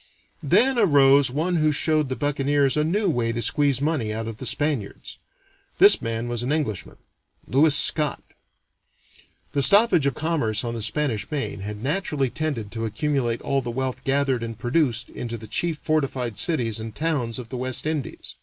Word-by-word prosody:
Then 260 0 +3
arose 140 - +5
one 165 +7 -1
who 155 -1 +2
showed 155 -1 +1
the 130 - -2
buccaneers 145 -1 0
a 150 - +1
new 195 +6 0
way 120 -8 0
to 115 - -4
squeeze 140 +2 +2
money 145 -8 -1
out 110 +1 -4
of 115 -1 -6
the 130 - -4
Spaniards. 145 -9 -2 0.6
This 400 +2 +7
man 115 +1 -3
was 120 -1 -3
an 125 +3 -2
Englishman 145 - -3 0.5
Lewis 145 +3 +3
Scot. 150 0 +1 1.3
The 140 - 0
stoppage 200 - +5
of 135 - -1
commerce 145 -10 -1
on 120 -1 -3
the 115 - -5
Spanish 110 +1 -2
Main 140 -9 -4
had 105 +2 -7
naturally 145 -4 -1
tended 145 -10 -3
to 115 -1 -4
accumulate 120 0 -1
all 140 0 0
the 120 - -6
wealth 130 +1 -3
gathered 135 -2 +1
and 115 -1 -6
produced 120 -1 0
into 120 -1 -5
the 110 - -11
chief 165 +8 -2
fortified 135 -7 -2
cities 120 - 0
and 110 -1 -7
towns 140 -8 -1
of 120 -3 -8
the 130 - -5
West 130 +2 -1
Indies. 155 -4 -4
135 Hz, 175 wpm, -23 LUFS, 115-150 Hz, 1.3 s, This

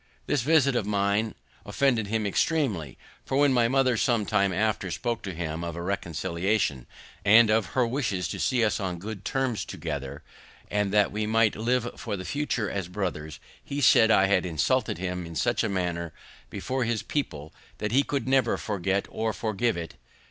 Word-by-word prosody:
This 145 - +1
visit 140 -1 +3
of 110 -4 0
mine 100 +2 0 0.3
offended 125 -6 +1
him 110 0 -1
extreamly; 100 - 0 0.3
for, 135 - -2
when 145 -1 +4
my 120 -2 +4
mother 130 0 +2
some 115 -3 +1
time 100 -2 +2
after 100 0 0
spoke 120 +5 -2
to 95 - -5
him 80 0 -4
of 85 -1 -4
a 85 - -5
reconciliation, 90 - -1 0.4
and 110 +2 +6
of 110 -2 +2
her 125 - +4
wishes 115 -7 -1
to - - -5
see 125 -3 +2
us 105 -4 0
on 95 -3 -3
good 100 +2 -7
terms 130 -4 -1
together, 70 +2 -6 0.5
and 105 -1 0
that 105 -1 +3
we 105 +1 -2
might 110 -1 +3
live 120 +2 0
for 105 -4 -4
the 95 - -7
future 145 -6 -1
as 100 -4 -3
brothers, 90 -5 -4 0.2
he 140 - -4
said 115 -4 +6
I 95 -3 +5
had 95 -2 +2
insulted 90 - 0
him 90 -1 -4
in 85 - -9
such 120 +11 +1
a 110 - 0
manner 85 -3 -2 0.4
before 130 0 -2
his 115 -2 -1
people 75 - -4 0.2
that 105 -1 -3
he 135 +4 +5
could 140 -1 -3
never 130 -3 +2
forget 100 -1 -1
or 110 0 -1
forgive 110 0 -1
it. 85 -1 -7
105 Hz, 185 wpm, -27 LUFS, 90-120 Hz, 0.5 s, and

